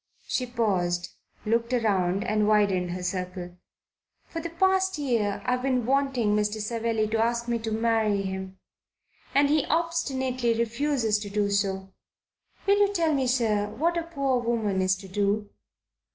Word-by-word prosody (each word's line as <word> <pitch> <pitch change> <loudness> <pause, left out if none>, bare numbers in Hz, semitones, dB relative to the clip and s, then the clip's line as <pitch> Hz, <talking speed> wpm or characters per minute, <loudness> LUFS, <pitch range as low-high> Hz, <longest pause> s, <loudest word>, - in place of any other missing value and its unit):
She 250 - -1
paused, 180 -7 0 0.4
looked 230 +2 +1
round 195 -5 +1
and 215 -2 +1
widened 200 -4 +2
her 180 +1 -4
circle. 180 -1 -4 0.7
"For 330 - -6
the 335 - -4
past 380 +2 +2
year 230 -8 0
I 250 - +1
have 250 0 0
been 255 -3 0
wanting 260 -5 +1
Mr. 210 +1 0
Savelli 225 0 -1
to 225 0 0
ask 235 +1 -1
me 235 -1 0
to 225 0 -4
marry 220 -2 +1
him, 190 0 -5 0.8
and 285 +1 +5
he 300 0 +3
obstinately 265 -7 0
refuses 235 -1 0
to 205 -1 -6
do 205 0 0
so. 190 -1 -1 0.7
Will 400 +1 +4
you 405 -1 +4
tell 335 -5 +1
me, 265 -2 +1
sir, 220 -5 +1
what 330 +10 0
a 340 - 0
poor 275 -6 -1
woman 225 -5 0
is 185 0 +2
to 190 +1 -11
do?" 205 +2 -1
225 Hz, 160 wpm, -26 LUFS, 200-265 Hz, 0.8 s, and